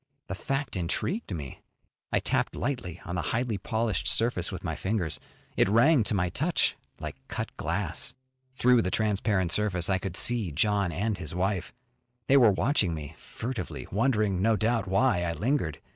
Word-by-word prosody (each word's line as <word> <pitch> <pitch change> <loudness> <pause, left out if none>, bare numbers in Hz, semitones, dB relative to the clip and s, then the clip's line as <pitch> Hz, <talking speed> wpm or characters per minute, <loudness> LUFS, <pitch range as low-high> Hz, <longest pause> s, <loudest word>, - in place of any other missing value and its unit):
The - - -2
fact 135 +7 -3
intrigued 95 - -2
me. 75 -7 -6 0.5
I - - +3
tapped - - 0
lightly 120 - -3
on 90 - -5
the 90 - -1
highly 115 +5 -1
polished 110 -3 -1
surface 115 -6 +2
with 90 -1 -6
my 80 -3 -2
fingers. 95 -4 -2 0.4
It - - +3
rang 125 +7 +5
to 105 - 0
my 90 -2 +1
touch 155 - +1 0.2
like 75 -3 -6
cut - - -5
glass. - - -2 0.4
Through 125 -2 +4
the 90 - -1
transparent 100 -3 +1
surface 95 -3 +1
I 95 - +2
could 95 -1 -4
see 115 -8 +3
John 100 +4 +1
and 105 +3 -1
his 80 -2 -5
wife. 95 0 -1 0.5
They 135 - +4
were 120 -6 +7
watching 100 - +1
me 75 0 -7
furtively, 115 - -5
wondering, 105 -4 +1
no 110 +2 +4
doubt, 110 -1 0
why 95 0 +3
I 85 -1 -1
lingered. 90 - -1
100 Hz, 170 wpm, -28 LUFS, 90-115 Hz, 0.5 s, were